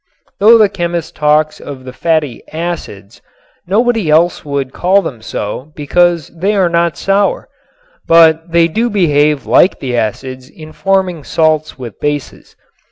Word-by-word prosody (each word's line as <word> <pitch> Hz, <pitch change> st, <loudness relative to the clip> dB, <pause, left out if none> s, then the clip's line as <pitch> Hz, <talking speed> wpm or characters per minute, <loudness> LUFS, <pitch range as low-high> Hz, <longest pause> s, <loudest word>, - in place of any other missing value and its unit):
Though 220 Hz, +4 st, +7 dB
the 215 Hz, -2 st, +5 dB
chemist 175 Hz, -4 st, -4 dB
talks 150 Hz, +1 st, +1 dB
of 135 Hz, -3 st, -9 dB
the 130 Hz, -, -8 dB
fatty 155 Hz, -5 st, -1 dB
"acids," 155 Hz, -, -6 dB, 0.5 s
nobody 225 Hz, -2 st, +1 dB
else 165 Hz, +3 st, +2 dB
would 140 Hz, -2 st, -4 dB
call 195 Hz, +3 st, +2 dB
them 125 Hz, -9 st, -6 dB
so 110 Hz, +6 st, -6 dB
because 170 Hz, +2 st, +1 dB
they 190 Hz, +6 st, -2 dB
are 190 Hz, -3 st, +2 dB
not 170 Hz, -1 st, 0 dB
sour. 195 Hz, +1 st, 0 dB, 0.6 s
But 165 Hz, 0 st, +4 dB
they 170 Hz, 0 st, +4 dB
do 225 Hz, +8 st, -1 dB
behave 150 Hz, -7 st, +1 dB
like 185 Hz, -, +3 dB
the 125 Hz, -2 st, -3 dB
acids 130 Hz, +3 st, -4 dB
in 155 Hz, 0 st, -13 dB
forming 190 Hz, -5 st, -1 dB
salts 155 Hz, -1 st, 0 dB
with 120 Hz, -6 st, -9 dB
bases. 145 Hz, -1 st, -5 dB
160 Hz, 145 wpm, -14 LUFS, 145-180 Hz, 0.6 s, Though